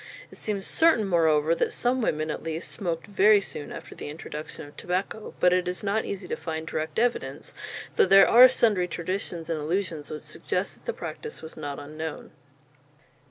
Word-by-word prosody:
It - - -12
seems 200 -3 -3
certain, 320 -10 +4
moreover, 160 -3 +3
that - - 0
some 250 +1 +1
women, 155 -7 0
at - - -5
least, 165 +1 -4
smoked 170 -6 -3
very 205 +2 +5
soon 150 -6 -7
after - - -8
the - - -7
introduction 155 0 -7
of 145 - -16
tobacco; 190 +4 -3
but 180 0 +5
it 180 -1 +1
is 180 +2 -3
not 205 +2 0
easy 195 -2 -5
to - - -1
find 160 -1 -5
direct 155 -1 -4
evidence, 240 +1 -1 0.4
though 435 - +6
there 195 0 +8
are 250 +2 +9
sundry 215 -8 +2
traditions 175 -1 -4
and 165 -2 -1
allusions 165 -2 -2
which 150 - -6
suggest - - -3
that - - -20
the 475 - 0
practice 450 - -7
was 160 - -9
not 145 -1 -5
unknown. 155 +1 -6
180 Hz, 185 wpm, -26 LUFS, 160-205 Hz, 0.4 s, are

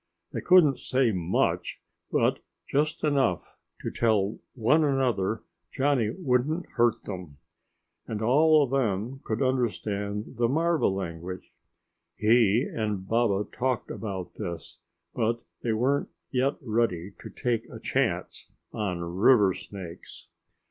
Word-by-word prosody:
They - - -3
couldn't 170 -7 +6
say 130 -3 +2
much, 90 -3 0 0.3
but - - +2 0.3
just 150 +2 0
enough 135 - +1 0.3
to - - -3
tell 110 -3 +1 0.2
one 130 +7 +3
another 125 -7 +1 0.3
Johnny 135 -5 +1
wouldn't 155 +2 0
hurt 120 -1 +2
them. 90 -8 -7 0.7
And 110 -2 -3
all 150 +7 +5
of 135 - -3
them 125 0 -1
could 110 +4 -1
understand 105 -3 -2
the 120 -1 +2
marva 165 +4 +2
language. 90 -1 -5 0.6
He 110 +1 +4
and 105 -7 -3
Baba 110 -3 +2
talked 130 -1 -1
about 95 -5 -5
this, 85 -6 -6 0.3
but 115 +1 0 0.2
they 115 - 0
weren't 130 +6 +1 0.2
yet 135 +2 +1
ready 105 -6 0
to - - -9
take 115 -2 -2
a - - -9
chance - - -1 0.2
on 90 -5 -2
river 95 +4 +4
snakes. 90 -4 -10
115 Hz, 120 wpm, -27 LUFS, 100-130 Hz, 0.7 s, couldn't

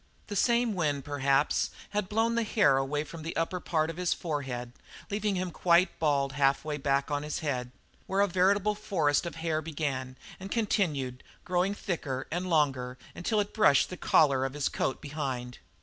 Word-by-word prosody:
The 205 - -4
same 235 +2 +3
wind, 145 -7 -1
perhaps, 140 0 +1 0.2
had 205 -2 -1
blown 225 +2 +1
the 235 - +1
hair 210 - +3
away 140 +2 0
from 160 +1 -9
the 165 +2 -5
upper 165 +2 -1
part 160 -2 0
of 165 - -12
his 180 -1 +1
forehead, 135 -7 -4 0.4
leaving 205 -1 0
him 180 -1 -2
quite 170 +2 +3
bald 140 -3 +2
half 135 +1 +2
way 150 -1 -2
back 140 0 0
on 145 0 0
his 150 +3 -4
head, 125 -4 -1 0.4
where 195 +1 +1
a 200 - +4
veritable 195 +3 +2
forest 175 -7 +1
of 170 - -6
hair 160 -1 -1
began, 140 -5 -3 0.2
and 190 +1 -7
continued, 155 - 0 0.2
growing 180 +3 +1
thicker 140 -10 -3
and 180 +3 -2
longer, 135 -6 +1 0.2
until 210 +5 0
it 205 0 -1
brushed 200 - +4
the - - -4
collar 140 -6 +3
of 135 0 -2
his 145 -2 0
coat 130 - -2
behind. 135 -5 -4
155 Hz, 180 wpm, -29 LUFS, 140-185 Hz, 0.4 s, a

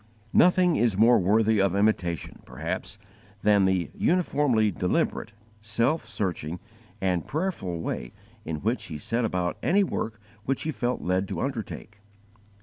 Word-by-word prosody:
Nothing 180 -1 +5
is 115 -5 +2
more 115 +2 +6
worthy 105 +2 +3
of 95 -1 +2
imitation, 100 -5 0
perhaps, - - -5 0.5
than 105 -2 +5
the 95 -3 0
uniformly 145 - +2
deliberate, 90 +4 -1 0.3
self 115 +9 0
searching, 90 -3 -3 0.4
and 90 -3 0
prayerful 150 - -2
way - - -4 0.3
in 80 -4 -4
which 115 +5 -1
he 80 - -6
set 115 +11 -1
about 90 -5 -1
any 200 +3 +3
work 110 - -3 0.2
which 135 +3 -1
he 155 - -1
felt 125 -3 -2
led 90 +2 0
to - - -4
undertake. 110 -5 -5
105 Hz, 140 wpm, -26 LUFS, 90-125 Hz, 0.5 s, more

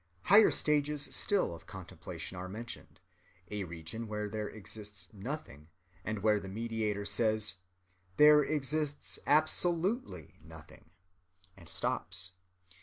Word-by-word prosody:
] 90 - -36
Higher 210 +2 +9
stages 150 -1 +1
still 200 - +2
of 85 0 -11
contemplation 90 -2 -7
are 90 +1 -5
mentioned—a 100 -3 -8
region 85 +7 -5
where 105 0 -2
there 105 0 -3
exists 105 -3 -8
nothing, 100 - -6 0.4
and 105 -2 -3
where 105 -1 +4
the 95 - -8
meditator 105 -1 -1
says: 110 -3 +2 0.6
"There 150 0 +9
exists 150 0 -2
absolutely 165 - +1
nothing," 80 - -14 0.7
and 85 -4 -14
stops. 95 +4 -2
105 Hz, 110 wpm, -33 LUFS, 95-145 Hz, 0.7 s, Higher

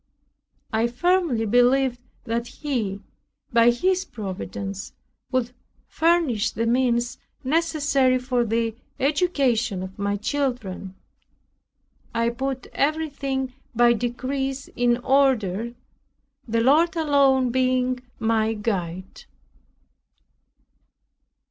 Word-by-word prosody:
I 225 +2 +2
firmly 285 -2 +1
believe 245 +3 +3 0.2
that 235 0 -2
He, 225 -11 -3 0.5
by 230 0 +6
His 365 +10 +1
Providence, 195 -3 -6 0.4
would 255 -2 0 0.3
furnish 325 -10 +2
the 230 +3 -2
means 240 0 +1 0.2
necessary 285 -3 +2
for 250 -1 0
the 230 0 -1 0.2
education 260 - +1
of 190 +1 -9
my 200 0 0
children. 215 -7 -3 1.2
I 230 0 +2
put 265 +1 -3
everything 275 -3 -1 0.2
by 240 +1 +5
degrees 265 +3 -3
in 240 -1 +1
order, 240 -5 +1 0.7
the 230 0 +1
Lord 315 +7 +4
alone 275 -5 +3
being 255 0 +1 0.2
my 225 -1 +1
guide. 185 -4 -4
245 Hz, 90 wpm, -24 LUFS, 225-275 Hz, 1.2 s, by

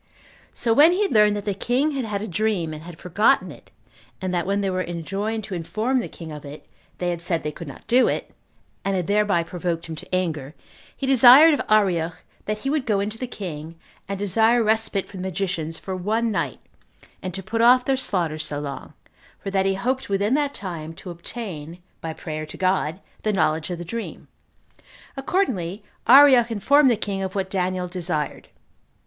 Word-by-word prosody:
So 230 - +2
when 305 +8 +7
he 395 +3 +1
had 400 - -1
learned 210 -2 +5
that 205 - -5
the 205 - 0
king 255 +9 0
had 270 -4 -2
had 205 -2 -3
a - - -4
dream, 190 -4 -1
and 155 - -8
had 170 0 -10
forgotten 185 0 +2
it, - - -15 0.5
and 185 -1 -3
that 175 0 -1
when 200 +1 +1
they 195 - 0
were 185 0 -1
enjoined 195 +6 -3
to 200 - -7
inform 220 +9 -1
the 235 - -3
king 165 -2 -10
of 150 -1 -8
it, 145 +1 -10 0.3
they 180 -1 -1
had 170 -1 -4
said 170 -1 -1
they 150 - -2
could 165 +2 -9
not 140 - -11
do 250 +2 +4
it, - - -3 0.5
and 195 0 0
had 180 -2 -1
thereby 200 -3 +2
provoked 170 -1 -3
him 160 - -6
to 185 - -4
anger, 155 -5 -2 0.4
he 275 - -3
desired 265 +4 +8
of 285 - 0
Arioch 175 -6 +2 0.3
that 215 0 -2
he - - +1
would 290 -4 -1
go 210 -3 +2
in 200 +2 -1
to 220 - -8
the 255 - -3
king, 165 -8 -7 0.3
and 200 0 -3
desire 220 +4 +3
respite 220 -2 +1
for 195 - -11
the - - -5
magicians 180 -4 -3
for 190 +3 -5
one 220 +5 0
night, - - -2 0.6
and 185 - -4
to 190 - -5
put 225 +5 -1
off 250 +2 +6
their 270 - +2
slaughter 175 -11 -1
so 150 -2 0
long, 140 -2 -7 0.4
for 195 - -6
that 195 0 +2
he 195 - +1
hoped 255 +6 -2
within 200 +4 +1
that 285 0 0
time 165 -4 -6
to 180 - -8
obtain, 170 -3 -7 0.2
by 165 - -4
prayer 155 -1 -6
to - - -9
God, 185 -3 0 0.2
the 215 - 0
knowledge 160 -4 +1
of 175 - -3
the 175 - -7
dream. 230 +6 -6 0.9
Accordingly, 225 - -1 0.2
Arioch 260 -2 +8
informed 265 +6 +4
the 240 - +3
king 200 -2 -3
of 190 0 -4
what 190 -1 -2
Daniel 185 -1 -1
desired. 175 -4 -3
195 Hz, 205 wpm, -23 LUFS, 170-225 Hz, 0.9 s, desired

